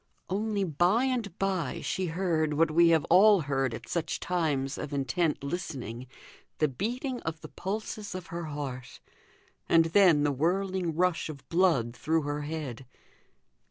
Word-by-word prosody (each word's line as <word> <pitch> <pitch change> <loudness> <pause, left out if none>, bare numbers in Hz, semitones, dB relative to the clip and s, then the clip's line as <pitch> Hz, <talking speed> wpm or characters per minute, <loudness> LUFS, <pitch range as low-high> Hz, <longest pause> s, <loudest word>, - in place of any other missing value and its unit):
Only 205 +1 0
by 180 - +2
and 240 -8 -2
by 195 -3 -1
she 190 -1 -2
heard, 160 -3 0
what 165 +1 +3
we 170 +2 +5
have 160 -3 +3
all 200 +2 +7
heard 135 -4 -1
at - - -10
such 165 -2 -2
times 150 -6 -1
of 145 - -5
intent 140 +3 0
listening, 130 - -5 0.5
the 155 - +3
beating 245 - -3
of 160 -1 -5
the - - -9
pulses 205 +1 -5
of 185 -2 -6
her 170 0 -3
heart, 140 -4 -6 0.7
and 165 -1 +5
then 175 -7 +6
the 145 - +2
whirling 180 +3 0
rush 180 -1 +1
of 140 -4 -9
blood 165 -10 +2
through 155 +6 0
her 145 +1 -3
head. 145 -5 -5
165 Hz, 155 wpm, -29 LUFS, 145-190 Hz, 0.7 s, all